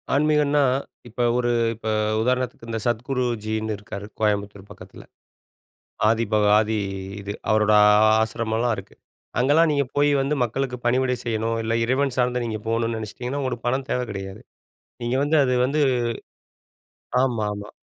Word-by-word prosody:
ஆன்மீகன்னா, 150 0 +3 0.5
இப்ப 120 +2 -5 0.2
ஒரு 120 -1 +1 0.3
இப்ப 110 0 -8 0.3
உதாரணத்துக்கு 125 -1 -1
இந்த 115 -1 -2
சத்குருஜின்னு 115 -3 -1
இருக்காரு 100 0 -8
கோயம்புத்தூர் 100 -2 -1
பக்கத்தில, - - -12 1.1
ஆதிபக 110 -2 +2
ஆதி 110 0 0 0.4
இது 100 +1 -5 0.2
அவரோட 110 0 +3 0.5
ஆசிரம்மலாம் 115 +1 -1
இருக்கு, 95 - -10 0.4
அங்கேலாம் 155 +5 +4
நீங்க 140 -1 +1
போய் 145 0 +4
வந்து 145 +2 0
மக்களுக்கு 125 +1 -3
பணிவிடை 125 +1 +2
செய்யணும், 115 0 -1
இல்ல 115 +1 0
இறைவன் 130 +1 0
சார்ந்த 125 -1 +1
நீங்க 110 -2 -4
போணும்னு 115 0 0
நெனைச்சிட்டிங்கன்னா, 125 +6 -5
உங்களுக்கு 120 -2 -4
பணம் 130 +1 -1
தேவ 125 - 0
கிடையாது. 95 -1 -7 0.6
நீங்க 120 +2 0
வந்து 155 +1 +2
அது 125 -1 +1
வந்து 150 +3 0 1.4
ஆமாமா. 105 -4 -2
120 Hz, 130 wpm, -23 LUFS, 110-130 Hz, 1.4 s, அங்கேலாம்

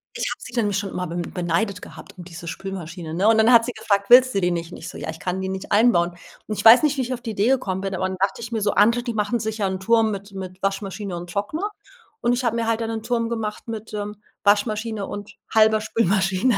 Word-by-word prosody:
Ich - - -2
habe - - -5
sie 250 - -10
dann 215 -4 0
schon 200 +1 -2
immer 180 0 -3
be 170 - -6
beneidet 175 +3 -2
gehabt - - -12
um 180 - -8
diese 170 -1 -10
Spülmaschine, 170 -2 -6
ne, 185 +5 +1
und 225 0 +5
dann 220 +2 +5
hat 230 -1 +7
sie 245 - -3
gefragt: 200 0 0
„Willst 255 -1 +7
du 195 - +2
die 180 0 +2
nicht?“ 170 0 -3
Und - - -8
ich 165 - -9
so: - - -9
„Ja, - - -5
ich 160 - -6
kann 185 +1 -3
die 190 - -3
nicht 190 0 -6
einbauen.“ 205 -6 +4 0.4
Und 215 - -3
ich - - -3
weiß 230 +4 +9
nicht, 295 -2 +2
wie - - +1
ich 255 0 -2
auf 240 - -12
die 230 - -4
Idee 210 +2 +1
gekommen 200 -8 0
bin, 195 -1 -3
aber 185 - -1
dann 190 0 -5
dachte 195 +4 0
ich 230 0 -7
mir 225 -2 -1
so: 205 0 +2
„Andere, 230 +4 +4
die 240 -1 -3
machen 210 +3 0
sich 220 +1 -4
ja 200 - +1
'n 190 0 -3
Turm 225 +2 +3
mit 200 0 -7
mit 185 -1 -8
Waschmaschine 195 0 -3
und 175 0 -8
Trockner.“ 310 - -2 0.5
Und 240 - +2
ich 245 +1 -1
habe 230 -2 +1
mir 230 -1 -1
halt 230 0 0
dann 225 - -2
'nen 225 -1 -3
Turm 230 -1 0
gemacht 220 -2 -4
mit, 220 -1 -6
ähm, 210 0 -5 0.2
Waschmaschine 210 0 +1
und 205 +1 -8 0.2
halber 220 0 +5
Spülmaschine. 205 +1 +1
205 Hz, 270 wpm, -23 LUFS, 190-230 Hz, 0.5 s, weiß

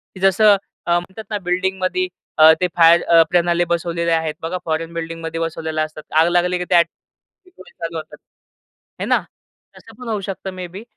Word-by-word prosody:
की - - -10
जसं 200 +2 +5 0.3
अ, - - -1
म्हणतात 190 +5 -10
ना 210 - -1
बिल्डिंगमध्ये 190 - 0 0.3
अ, 155 0 +9
ते 180 - +3
फायर 170 0 +6
अ, 165 -1 +5
प्रणाली 175 0 +2
बसवलेले 170 0 -1
आहेत. 160 -1 0
बघा 165 +3 -3
फोरेन 165 +1 -2
बिल्डिंगमध्ये 165 0 -5
बसवलेले 160 -1 -3
असतात. 155 0 -5 0.2
आग 165 - +4
लागली 175 +1 +1
की 180 - -4
ते - - +3
ऑटोमॅटिक 185 - -4
चालू 165 0 -4
होतात. 155 - -9 0.8
हे - - -1
ना - - +3 0.6
तसं - - -16
पण 250 - -9
होऊ 215 -2 -2
शकतं 195 0 -6
मेबी 185 +2 -8
170 Hz, 175 wpm, -19 LUFS, 165-185 Hz, 0.8 s, अ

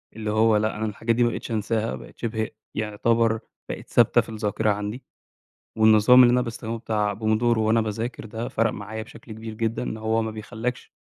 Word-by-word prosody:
اللي 110 -1 -3
هو 110 0 +4
لأ 110 +1 0
أنا 110 - -2
الحاجات 115 +2 -1
دي 120 - +3
ما 120 - +3
بقيتش 120 - -6
أنساها 110 +1 -1
بقِت - - -12
شِبه 110 -2 -2 0.3
يعتبر 115 +1 +1 0.3
بَقِت - - -6
ثابتة - - +4
في - - -12
الذاكرة 110 0 -1
عَندي، 105 +5 -4 0.8
والنظام 110 +3 +7
اللي 120 -1 +6
أنا 125 - +3
باستخدمه 115 -1 -5
بتاع 105 -2 -1
Pomodoro 110 +2 +1
وأنا 110 +1 +3
باذاكر 110 +2 -4
ده 110 +2 -5
فرَق 115 0 +1
معايا 110 +2 -6
بشَكل 115 0 -12
كبير 110 0 -7
جدًا، 115 +1 -2
إن 125 - -3
هو 110 +1 0
ما 110 - -3
بيخلّاكش 115 +3 -5
110 Hz, 190 wpm, -24 LUFS, 110-115 Hz, 0.8 s, والنظام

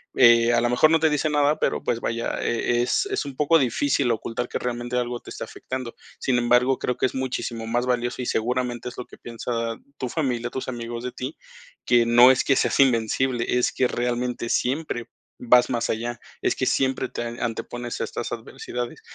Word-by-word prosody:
eh, 120 -1 +6
a 120 - +3
lo 120 - +1
mejor 125 +6 +4
no 165 - +4
te 160 - +4
dice 150 +1 0
nada, 150 0 +2
pero - - 0
pues 115 - 0
vaya, 115 0 -2
eh, 120 +1 +1
es 125 - +1
es 405 - -1
un 140 - -7
poco 150 +4 +4
difícil 135 0 +1
ocultar 115 +2 -3
que - - -3
realmente 120 0 -3
algo 120 0 -2
te - - -13
esté - - -6
afectando. 130 -2 -6 0.3
Sin 130 -2 +1
embargo, 125 +2 +3
creo 125 - -1
que - - +1
es - - -9
muchísimo 125 -3 -3
más 120 +2 0
valioso, 125 0 -1
y - - -3
seguramente 125 +1 -1
es 120 - -13
lo 125 - -5
que - - -15
piensa 115 0 -4 0.2
tu 130 - -3
familia, 120 -5 -1
tus 130 - -5
amigos 120 -1 -5
de 125 - -3
ti, 130 +5 -6 0.5
que 120 -1 +4
no 120 +2 +7
es 130 - +2
que 135 - +4
seas - - +1
invencible 120 -1 +2
es 125 - +2
que 130 - +2
realmente 120 0 -2
siempre 125 -3 -1 0.3
vas 125 0 +5
más 120 -2 -1
allá. 120 +2 -2 0.2
Es - - +1
que - - -1
siempre 130 -1 +1
te - - -5 0.2
antepones 120 +1 -4
a - - 0
estas - - -5
adversidades. 120 -1 -6
125 Hz, 205 wpm, -24 LUFS, 120-130 Hz, 0.5 s, no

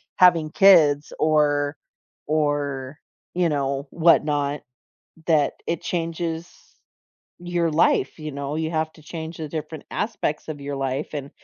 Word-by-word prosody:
having 165 -4 +5
kids 155 -7 +5
or 150 -1 +2 0.5
or, 145 -2 -1 0.3
you 175 -2 +2
know, 140 -1 -1
whatnot, 150 -3 +2 0.7
that 150 -4 +3
it 170 - -1
changes 165 -1 -3 0.9
your 175 -1 0
life, 150 -3 +2
you 155 -1 -5
know? 140 +1 -4
You 160 +1 -2
have 160 0 -1
to 155 - -18
change 160 +1 -7
the 155 - -5
different 155 -1 -6
aspects 205 -8 -2
of 150 -2 -6
your 140 0 -4
life 135 +2 -2
and 140 -1 -5
155 Hz, 130 wpm, -23 LUFS, 145-165 Hz, 0.9 s, having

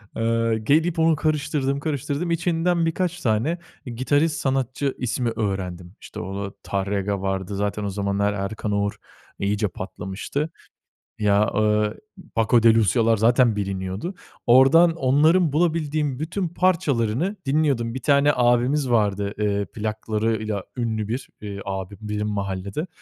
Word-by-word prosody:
Aaa, 115 0 +1
gelip 155 +10 +2
onu 160 0 +4
karıştırdım, 145 -2 0
karıştırdım 150 +2 -2
içinden 170 0 +1
birkaç 175 +1 -1
tane 120 +9 +1 0.3
gitarist 145 +6 0
sanatçı 135 0 -1
ismi 125 0 -1
öğrendim. 95 -4 -3
İşte, - - -9
o 100 +2 -4 0.2
Tárrega 100 0 -2
vardı. 95 0 -2
Zaten 105 +1 -2
o 100 - -1
zamanlar 100 +1 0
Erkan 105 +2 -3
Oğur 100 0 0 0.4
iyice 105 +1 0
patlamıştı. 95 - -4 0.7
Ya, 105 0 +3
ııı, 105 0 +1 0.4
Paco 115 +1 +3
de 115 - +8
Lucía´lar 115 +1 +3
zaten 120 +1 +4
biliniyordu. 95 - -3 0.3
Ordan, 150 +7 +6
onların 155 +3 +3
bulabildiğim 155 -4 0
bütün 170 +4 -2
parçalarını 165 - +1
dinliyordum. 135 -5 +1
Bir 130 - -4
tane 140 +2 +4
abimiz 125 +3 +2
vardı, 105 -3 +1
ııı, 100 -1 0
plaklarıyla 110 +1 -2
ünlü 110 -3 -1
bir, 120 +4 -4 0.2
ııı, 100 -1 -6
abim 95 0 -5
benim 105 0 -3
mahallede 100 - -3
115 Hz, 125 wpm, -23 LUFS, 100-145 Hz, 0.7 s, de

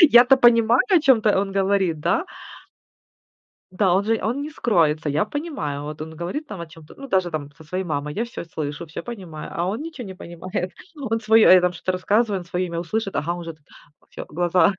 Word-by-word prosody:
Я-то 265 -5 +8
понимаю, 235 -1 +5
о 360 - +6
чём-то 225 -8 +4
он 195 -1 -3
говорит, 195 -4 +1
да? 330 - +1 1.5
Да, 185 -1 +2
он 195 - +2
же 225 0 +1
он 240 +6 -1
не 295 - -4
скроется, 160 - +1
я 150 +8 +1
понимаю. 215 - -4
Вот 150 +1 -7
он 160 +1 -6
говорит 185 - -4
там 200 -9 -7
о 170 - -7
чём-то, 160 -1 -15
ну, 275 - -8
даже 185 -6 +1
там 145 -2 -4
со 160 - -14
своей 185 +5 -3
мамой, 150 -3 -3
я 220 - -1
всё 235 -7 -7
слышу, 155 -1 -5
всё 155 +1 -7
понимаю, 185 -10 -8
а 170 - -1
он 210 +9 -2
ничего 310 -8 -7
не 190 - -7
понимает. 180 +2 -5 0.2
Он 240 -6 -2
своё, 220 0 +5
э, 185 -1 +8
там 180 0 +1
что-то 180 +2 -2
рассказывает, 205 +2 +1
он - - -12
своё 180 +1 -2
имя 170 -1 -4
услышит, 195 +2 -3
ага, 150 +4 -1
он 175 - -6
уже 165 -2 -7 0.5
всё, - - -8
глаза, 175 +3 +3
185 Hz, 210 wpm, -23 LUFS, 165-225 Hz, 1.5 s, Я-то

